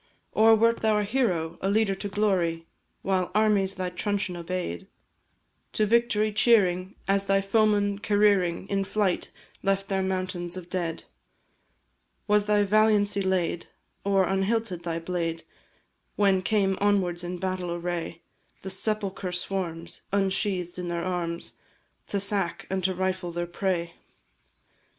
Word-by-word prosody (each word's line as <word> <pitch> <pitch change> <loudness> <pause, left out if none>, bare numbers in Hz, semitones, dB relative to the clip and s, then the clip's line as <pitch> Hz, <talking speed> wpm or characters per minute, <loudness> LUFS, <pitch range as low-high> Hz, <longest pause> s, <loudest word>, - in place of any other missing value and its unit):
Or 225 +1 +6
wert 230 +1 +3
thou 220 -1 +2
a 210 - +1
hero, 195 -8 0
a 195 - 0
leader 210 -1 +2
to 195 +1 -4
glory, 185 -5 0 0.4
While 185 -2 0
armies 205 -3 +3
thy 185 -1 -3
truncheon 200 0 -2
obey'd; 170 - -4 0.9
To 215 - +2
victory 215 -1 +2
cheering, 195 -4 +3
as 195 0 +2
thy 195 0 +3
foemen 205 0 +2
careering 205 -4 +2
In 195 -1 0
flight, 195 -2 0 0.3
left 195 0 0
their 195 -1 +1
mountains 185 -2 -3
of 180 -1 -9
dead? 170 -3 -2 1.2
Was 210 -1 +3
thy 210 -1 +4
valiancy 205 -1 +3
laid, 185 -3 0 0.4
or 195 -1 +3
unhilted 195 -1 0
thy 170 -1 -3
blade, 165 -1 -3 0.7
When 195 -2 +3
came 195 -1 +1
onwards 185 -4 +2
in 175 +1 -4
battle 185 -1 -3
array 170 -1 -4 0.4
The 190 - -4
sepulchre 195 -2 -2
swarms, 175 -2 -4
ensheathed 190 -2 -1
in 180 - -4
their 170 0 -2
arms, 170 -2 -3 0.5
To 200 - -1
sack 195 -3 -1
and 190 -1 -1
to 190 -1 +1
rifle 185 -1 -2
their 175 +1 -2
prey? 175 -1 -2
190 Hz, 135 wpm, -27 LUFS, 175-205 Hz, 1.2 s, Or